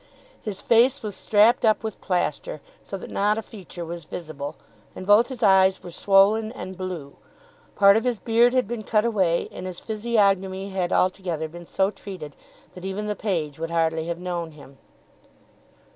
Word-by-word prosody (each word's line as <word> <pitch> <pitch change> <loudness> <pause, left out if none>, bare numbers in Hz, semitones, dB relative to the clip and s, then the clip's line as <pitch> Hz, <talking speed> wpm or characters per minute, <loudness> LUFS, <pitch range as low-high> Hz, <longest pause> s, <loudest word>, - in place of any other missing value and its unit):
His 205 -3 -5
face 245 +4 +4
was 210 -2 -4
strapped 215 +3 +4
up 220 -1 +3
with 220 -2 -5
plaister 175 -4 -2 0.2
so 195 - -6
that - - -10
not 210 +2 +1
a 225 - -3
feature 185 -5 -9
was 170 -1 -7
visible; 155 -4 -6 0.4
and 185 - -7
both 205 +4 +5
his 255 -3 -6
eyes 190 -1 +4
were 175 - -8
swollen 200 +5 +3
and 190 -6 -7
blue; 180 -7 -6 0.6
part 200 0 +6
of 220 - +2
his 245 -2 0
beard 235 +3 +3
had 255 -5 +2
been 235 0 -4
cut 215 0 +1
away, 190 -7 +1
and 185 - -7
his 180 -1 -7
physiognomy 200 -4 0
had 185 -2 -2
altogether 180 -4 0
been 170 +1 -11
so 195 +1 +1
treated 180 -9 -9 0.4
that 180 - -11
even 195 +2 -3
the 210 0 -2
page 160 -9 -2
would 165 0 -3
hardly 165 -1 0
have 170 0 -3
known 175 -2 -4
him. 140 -2 -15
190 Hz, 175 wpm, -24 LUFS, 170-215 Hz, 0.6 s, part